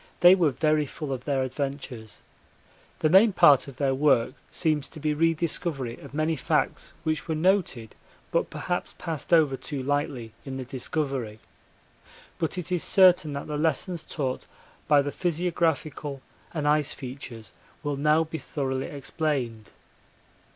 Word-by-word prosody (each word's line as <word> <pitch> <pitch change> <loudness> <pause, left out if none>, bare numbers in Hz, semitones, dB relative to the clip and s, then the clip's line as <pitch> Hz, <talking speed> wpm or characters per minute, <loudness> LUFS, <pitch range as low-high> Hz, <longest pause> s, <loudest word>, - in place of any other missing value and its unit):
They 175 +1 +9
were 175 -5 +4
very 155 +2 +1
full 145 0 -5
of 125 0 -6
their 135 -3 +1
adventures. 130 -4 -5 0.8
The 155 - +3
main 195 +5 +6
part 145 -7 +6
of 135 - -9
their 135 -1 +1
work 130 -3 +3 0.2
seems 155 -4 0
to 160 - -11
be 150 0 0
rediscovery 160 -5 -1
of - - -11
many 155 +2 0
facts 135 - -1
which 155 -1 -1
were 160 - -1
noted 155 - +1 0.4
but - - +1
perhaps 180 0 -3
passed 165 -3 -5
over 155 -5 +5
too 135 0 -5
lightly 140 -5 -2
in 135 -1 -6
the 130 - -5
Discovery 130 -4 -3 1.0
but 165 +2 -1
it 180 0 -5
is 180 -2 +1
certain 180 -5 +5
that 140 - -4
the 150 -1 -3
lessons 160 +3 -1
taught 130 -4 -3 0.4
by 145 -2 +5
the 145 - -3
physiographical 160 -5 -1 0.3
and 150 -3 -2
ice 150 -1 +2
features 125 -4 -9 0.3
will 145 -1 -1
now 150 +3 +3
be 160 0 -6
thoroughly 135 -2 -3
explained. 135 -6 -3
150 Hz, 150 wpm, -26 LUFS, 135-160 Hz, 1.0 s, They